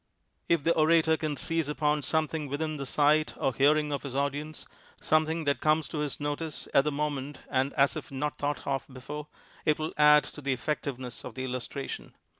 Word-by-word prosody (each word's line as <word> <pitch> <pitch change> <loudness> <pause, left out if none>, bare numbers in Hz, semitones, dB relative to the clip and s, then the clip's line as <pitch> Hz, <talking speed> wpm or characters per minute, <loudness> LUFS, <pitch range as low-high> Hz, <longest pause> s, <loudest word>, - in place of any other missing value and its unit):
If 170 -4 +3
the 170 - +4
orator 160 0 +4
can 155 -2 -3
seize 165 -1 0
upon 150 0 +1
something 155 0 -1
within 155 +2 -2
the 140 -1 -5
sight 150 +3 +3
or 135 - 0
hearing 150 +3 +3
of 140 - -2
his 135 -2 -6
audience 145 +2 -2 0.2
— - - -27
something 160 +1 +2
that 140 -1 0
comes 155 0 +3
to 155 - -4
his 150 -2 -3
notice 145 +1 -3
at 140 - +5
the 150 - +1
moment 145 -1 -2
and 135 0 +1
as 140 -1 +3
if - - -7
not 145 +2 -3
thought 145 0 -2
of 135 0 -1
before 145 +4 -7 0.2
— - - -25
it 150 -1 +3
will 155 +1 -3
add 150 0 +7
to 145 - -9
the 140 -1 0
effect 150 +4 -2
iveness 125 -3 -5
of - - -8
the 130 - -4
illustration. 130 +2 -5
150 Hz, 210 wpm, -29 LUFS, 140-155 Hz, 0.2 s, add